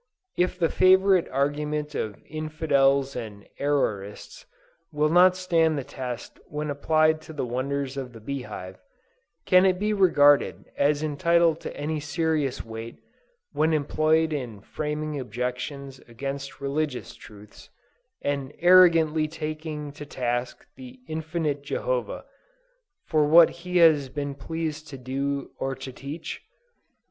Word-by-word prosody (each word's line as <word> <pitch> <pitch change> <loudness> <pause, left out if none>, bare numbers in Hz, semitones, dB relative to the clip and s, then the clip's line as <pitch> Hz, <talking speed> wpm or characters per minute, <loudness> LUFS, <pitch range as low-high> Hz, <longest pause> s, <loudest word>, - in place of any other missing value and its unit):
If 180 0 0
the 165 -3 +2
favorite 190 -1 +4
argument 150 +2 -1
of 105 -6 -3
infidels 140 -3 +1
and 105 -4 -7
errorists 105 -9 -2 0.5
will 150 0 +1
not 180 +2 +6
stand 165 -4 +2
the 140 - -2
test 125 -3 -7
when 150 0 -4
applied 155 +2 +2
to 160 0 -11
the 145 - -3
wonders 135 +2 -3
of 130 -2 -5
the 115 - -12
bee 140 +5 -4
hive, 95 -6 -8 0.7
can 185 0 +6
it 185 -1 +3
be 210 +3 0
regarded 145 -8 +4
as 145 +1 +2
entitled 165 +2 +2
to - - -7
any 150 +2 -2
serious 150 -3 -1
weight, 115 +1 -8 0.5
when 160 +1 +1
employed 155 +2 +2
in 120 -8 -5
framing 150 +3 -4
objections 125 +3 -5
against 135 +3 -6
religious 140 -1 -3
truths, 105 -1 -15 0.5
and 140 -1 -2
arrogantly 165 -3 +5
taking 155 -1 -5
to 145 - -9
task 120 -3 -3
the 260 -1 -11
infinite 160 -2 -2
Jehovah, - - -3 0.8
for 155 -2 +2
what 165 +2 +7
He 180 +1 -3
has 155 -5 +5
been 140 +1 -4
pleased 155 +1 -5
to 135 - -8
do 135 +2 -3
or 135 0 -2
to 135 0 -8
teach? 145 +6 -7
150 Hz, 130 wpm, -26 LUFS, 135-160 Hz, 0.8 s, what